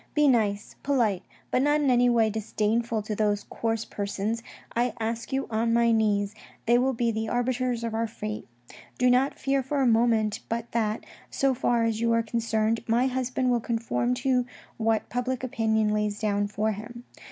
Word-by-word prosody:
Be 300 -1 +4
nice, 210 -5 +1
polite, 235 -10 +1 0.3
but 255 - +2
not 290 +2 +3
in 280 -3 +2
any 245 0 +4
way 225 -2 +3
disdainful 220 +1 -1
to 210 0 -3
those 205 -1 +1
coarse 225 -1 -2
persons. 205 +3 -3 0.3
I 240 +1 +1
ask 230 +2 -3
you 270 0 0
on 230 +1 +1
my 235 0 +4
lyiees; 210 -2 +2 0.3
they 240 +1 +4
will 265 +1 +2
be 235 -1 0
the 220 0 -2
arbiters 245 -1 0
of 230 -1 -3
our 225 +1 0
fate. 215 -1 -6 0.5
Do 250 0 +4
not 260 +3 +2
fear 275 0 +1
for 275 +2 -2
a 270 - +3
moment 225 -2 +3
but 230 0 -3
that, 220 -2 -1 0.2
so 275 -1 +1
far 240 -2 +1
as 225 -1 0
you 230 0 +2
are 230 0 +2
concerned, 225 0 0
my 235 +3 +3
husband 255 0 0
will 240 - +2
conform 235 +1 -1
to 250 -2 +2 0.3
what 225 -1 +1
public 250 +1 -2
opinion 220 -3 +1
lays 210 -1 0
down 205 -1 0
for 215 +1 -1
him. 235 +4 -8
230 Hz, 185 wpm, -27 LUFS, 220-245 Hz, 0.5 s, Be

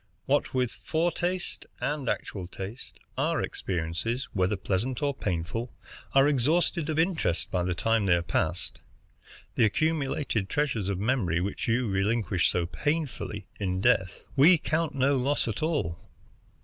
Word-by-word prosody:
What - - +2
with 125 -2 +1
foretaste 175 +2 -1
and 145 -4 -1
actual 95 -4 -3
taste, 95 +6 -8 0.2
our - - +1
experiences, 95 +10 -2
whether 95 +1 +2
pleasant 105 +7 -1
or 140 -1 +2
painful, 100 +3 -3 0.4
are 135 +1 +7
exhausted 150 +4 +2
of 155 - -1
interest 160 - +1
by 90 - +1
the 90 0 -1
time 115 +2 +2
they 90 - +6
are 85 - 0
past. 85 0 -1 0.7
The - - +3
accumulated 135 -5 0
treasures 120 -9 0
of 100 - -1
memory, 100 -6 +1
which 95 +3 -3
you 120 +1 +2
relinquish 100 -1 +1
so 90 -1 0
painfully 115 - -2
in 95 -2 -1
death, 95 -1 +2
we 160 +6 +7
count 160 0 -1
no 140 +1 +3
loss 135 +1 +1
at 110 - -3
all. 145 - 0
115 Hz, 145 wpm, -28 LUFS, 95-145 Hz, 0.7 s, are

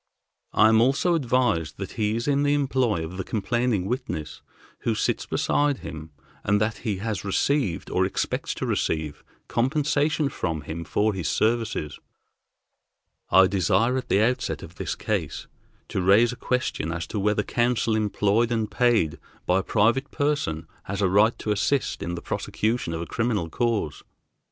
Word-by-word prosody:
I 110 - +5
am 110 0 +5
also 140 +8 +3
advised 125 - +1
that 95 -1 -5
he 105 -1 0
is 115 +3 -3
in 140 -1 +2
the 145 0 +3
employ 130 - +1
of 90 +3 -8
the 95 - -2
complaining 115 -1 0
witness 100 - -4 0.4
who - - -1
sits - - -1
beside 145 -2 +1
him, 80 0 -7 0.3
and 105 +1 +2
that 110 +1 0
he 105 -5 -2
has 105 -1 -3
received, 100 - 0
or - - +2
expects - - -2
to - - -3
receive, 80 -2 -2 0.2
compensation 150 +3 +1
from 80 - -3
him 80 +2 -6
for 105 +5 +1
his 90 -6 -3
services. 110 -10 0 1.3
I 95 +1 +7
desire 100 +6 +2
at 130 - -3
the 100 - +3
outset 125 +3 -1
of - - -10
this - - -3
case - - -3 0.4
to - - -1
raise 105 +6 +5
a - - -6
question 125 -11 -2
as 85 0 -3
to 105 - -4
whether 105 +1 +1
counsel 120 -1 +1
employed 110 +2 +1
and 110 -2 -1
paid 120 -11 +2 0.3
by 90 +1 +3
a - - 0
private 120 +9 +2
person 145 - -1 0.2
has 100 +1 -2
a 95 - +3
right 105 +5 +4
to 105 - -3
assist 130 +7 0
in 85 +1 -3
the 85 - -7
prosecution 110 -6 -2
of 80 - -3
a - - -6
criminal 110 -8 -1
cause. 110 -10 -1
110 Hz, 165 wpm, -25 LUFS, 95-125 Hz, 1.3 s, I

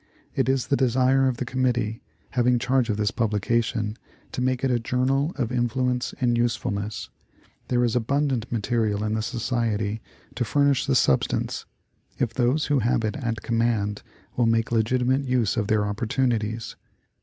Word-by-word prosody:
It - - +1
is 135 -2 +1
the 140 - +1
desire 130 +1 +3
of 125 -2 -1
the 125 - -3
Committee 120 -3 -1 0.3
having 125 0 +3
charge 130 0 +1
of 105 - 0
this 105 +1 +1
publication 110 -1 0 0.4
to - - -3
make 130 0 0
it 135 - +2
a 120 - +2
journal 130 +5 +1
of 120 -4 -1
influence 125 +1 0
and 120 -3 +2
usefulness. 110 -3 -2 0.6
There 125 -1 +2
is 120 -1 +1
abundant 130 0 0
material 110 -2 0
in 110 0 -1
the 110 - 0
Society 115 -3 -1 0.3
to 125 - -1
furnish 140 +2 +2
the 135 - +2
substance, 70 - +1 0.5
if 120 - -1
those 130 +5 +1
who 145 -2 +2
have 120 0 +1
it 110 - -2
at 120 -5 -3
command 115 -3 0 0.3
will 120 -2 +2
make 115 0 +1
legitimate 125 +4 +1
use 125 -5 +1
of 105 -4 -1
their 105 -1 +2
opportunities. 115 +1 -1
120 Hz, 160 wpm, -25 LUFS, 110-130 Hz, 0.6 s, desire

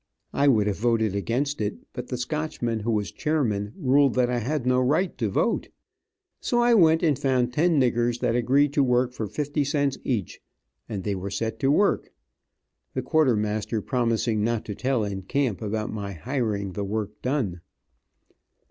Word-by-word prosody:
I 140 - +2
would 110 -7 +4
have 100 -2 -1
voted 115 -3 +1
against 125 +7 -1
it, 105 0 -2 0.2
but 125 0 -6
the 125 - -3
Scotchman, 125 -3 -2
who 110 +2 -3
was 105 -3 0
chairman, 115 -10 -1
ruled 140 -4 +3
that 125 -1 +2
I 120 - 0
had 130 +3 -2
no 125 0 +3
right 155 +8 +1
to 110 -4 0
vote. 165 - 0 0.7
So 240 - 0
I 240 0 +4
went 165 -6 +5
and 150 -5 +2
found 130 -3 +1
ten 160 +2 +3
niggers 120 -1 +1
that 120 -2 +1
agreed 135 +4 +3
to 145 - +3
work 125 -1 +2
for 110 -3 -4
fifty 145 +6 -1
cents 140 -1 0
each, 115 -8 -2 0.5
and 100 -4 -4
they 105 - -1
were 95 +1 -4
set 110 +2 -3
to 135 - +2
work, 200 +8 +2 0.8
the - - -1
quartermaster 110 -8 +1
promising 115 -3 0
not 115 0 -1
to 105 - -4
tell 125 +1 0
in 100 -2 -3
camp 115 0 -1
about 110 0 -3
my 100 -2 -4
hiring 105 - -2
the 100 +2 -4
work 105 +1 -4
done. 125 - -1
120 Hz, 175 wpm, -25 LUFS, 105-140 Hz, 0.8 s, went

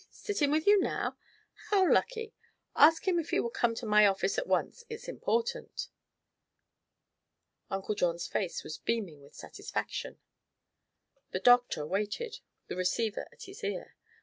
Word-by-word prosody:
Sitting 335 -9 -1
with 310 +2 +1
you 410 0 +7
now? - - -1 0.5
How 390 -3 +4
lucky. 455 +1 +1 0.4
Ask 320 +5 +6
him 355 -2 +3
if 325 - -4
he - - +2
will 235 - -1
come 230 -1 +1
to 235 - -5
my 210 -1 +6
office 200 - +1
at - - -4
once; 475 - 0
it's 450 -1 -7
important." 475 +2 -2 1.8
Uncle 195 +2 -2
John's 175 -4 0
face 185 -4 -2
was 155 - -7
beaming 195 -11 -2
with 140 +1 -17
satisfaction. - - -5 1.1
The - - -2
doctor 245 -10 +4
waited, 210 - -3 0.3
the - - -6
receiver 200 +4 -1
at - - -13
his 390 +2 -11
ear. - - -4
245 Hz, 145 wpm, -31 LUFS, -, 1.8 s, you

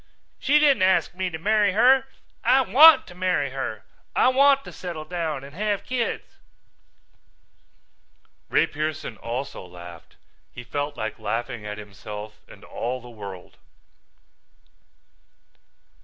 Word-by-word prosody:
"She 295 +2 +3
didn't 290 -7 +4
ask 185 -1 +3
me 185 0 -2
to 160 - -6
marry 205 +2 +2
her. 260 +5 +5 0.4
I 265 - +5
want 275 +6 +7
to 180 - -13
marry 180 -6 0
her. 110 -5 -5 0.3
I - - +5
want 275 +1 +4
to - - -10
settle 170 -4 -7
down 160 -5 -3
and 140 +1 -11
have 205 +3 -1
kids." 245 -3 -3 2.1
Ray - - +3
Pearson 155 -5 -4
also 120 +5 -5
laughed. 85 -2 -12 0.4
He 120 - -9
felt 145 +3 -4
like 110 0 -4
laughing 115 +1 -4
at 105 0 -5
himself 105 +1 -9
and - - -15
all 125 +2 -4
the 120 0 -13
world. 100 -5 -10
155 Hz, 125 wpm, -24 LUFS, -, 2.1 s, want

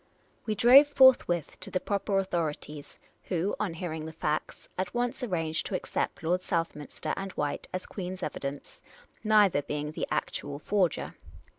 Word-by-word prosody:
" - - -38
We 215 - 0
drove 255 +7 +8
forthwith 260 - +4
to - - -6
the 185 - 0
proper 200 0 -1
authorities, 160 -5 -3 0.3
who, 180 +2 -1
on 190 -6 -2
hearing 160 -2 -4
the - - -6
facts, 155 -1 -3
at 185 +4 -3
once 245 +2 -1
arranged 165 -9 -1
to 195 - -3
accept 180 - -3
Lord 180 +3 +1
South 165 -2 -1
minster 150 -1 -5
and 195 0 -5
White 145 -1 -3
as 185 - -4
Queen's 185 -1 -6
evidence, 140 +1 -5 0.4
neither 210 -8 +5
being 150 +1 -4
the - - -3
ac - - -1
tual 145 0 -6
forger. 185 0 0
180 Hz, 165 wpm, -29 LUFS, 155-205 Hz, 0.4 s, drove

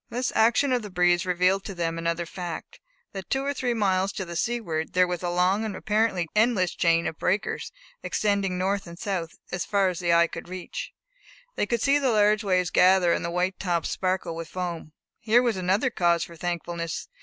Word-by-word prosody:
This 250 +2 -2
action 235 +5 +3
of 250 - +1
the 210 - -8
breeze 175 0 +2
revealed 180 +2 +2
to 195 - -6
them 165 -1 -2
another 170 +1 -1
fact, 175 -1 -7 0.3
that 195 -1 -7
two 270 0 0
or 285 - 0
three 250 -3 -1
miles 195 -2 +1
to 190 - -4
the 170 0 -7
seaward 170 -7 -2
there 180 0 +5
was 180 -1 -3
a 175 - -2
long 180 +4 +2
and 215 -3 -3
apparently 210 -5 0
endless 210 -5 +2
chain 165 0 +2
of 160 - -4
breakers 195 +4 -1 0.3
extending 200 -3 0
north 195 +1 -1
and 170 0 -10
south, 180 -5 -4
as 180 - -2
far 200 -2 +2
as 180 - -4
the 175 -1 +1
eye 170 0 +5
could 170 - -8
reach. 185 -1 -6 0.6
They - - 0
could 235 0 -1
see 280 +1 +4
the 270 -2 +1
large 210 -1 +3
waves 185 -3 +1
gather, 180 -2 +5
and - - -1
the 170 - -2
white 180 +2 -1
tops 175 -4 -1
sparkle 185 -3 -1
with 165 0 -6
foam. 175 -4 -5 0.3
Here 230 +2 +3
was 235 -3 +1
another 190 +7 +1
cause 170 -5 +2
for 170 - -9
thankfulness. 170 -1 -4
185 Hz, 205 wpm, -26 LUFS, 175-210 Hz, 0.6 s, there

